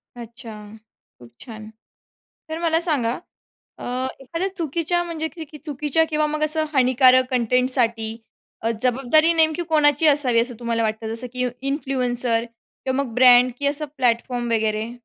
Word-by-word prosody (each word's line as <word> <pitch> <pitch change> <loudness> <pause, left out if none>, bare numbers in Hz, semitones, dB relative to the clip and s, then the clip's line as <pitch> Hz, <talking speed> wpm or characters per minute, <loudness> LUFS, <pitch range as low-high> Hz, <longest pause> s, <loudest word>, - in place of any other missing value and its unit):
अच्छा. 235 -1 -10 0.7
खूप 120 -1 -16
छान. 215 -2 -10 0.8
तर 320 +1 -5
मला 330 -1 +1
सांगा 275 -9 0 0.6
अ, - - -9 0.4
एखाद्या 335 +8 -3
चुकीच्या 340 0 -1
म्हणजे 325 -2 -4
च 315 -1 -9
चुकीच्या 295 +1 0
किंवा 305 0 0
मग 305 0 -3
असं 310 +1 +3
हानिकारक 255 0 +4
कंटेंटसाठी 240 -2 +1 0.5
अ, 225 - -1
जबाबदारी 270 +6 +3
नेमकी 320 +1 +1
कोणाची 300 0 +3
असावी, 275 -5 +4
असं 240 +1 -1
तुम्हाला 230 -1 -1
वाटतं? 220 0 -3
जसं 235 +2 -1
की 250 0 -1 0.2
इन्फ्लुएन्सर 250 -4 -1 0.4
किंवा 265 +1 0
मग 245 -4 -9
ब्रँड 250 0 +6
किंवा 285 0 0
असं 300 +1 -5
प्लॅटफॉर्म 240 -1 -1
वगैरे? 220 0 -1
255 Hz, 140 wpm, -21 LUFS, 235-305 Hz, 0.8 s, ब्रँड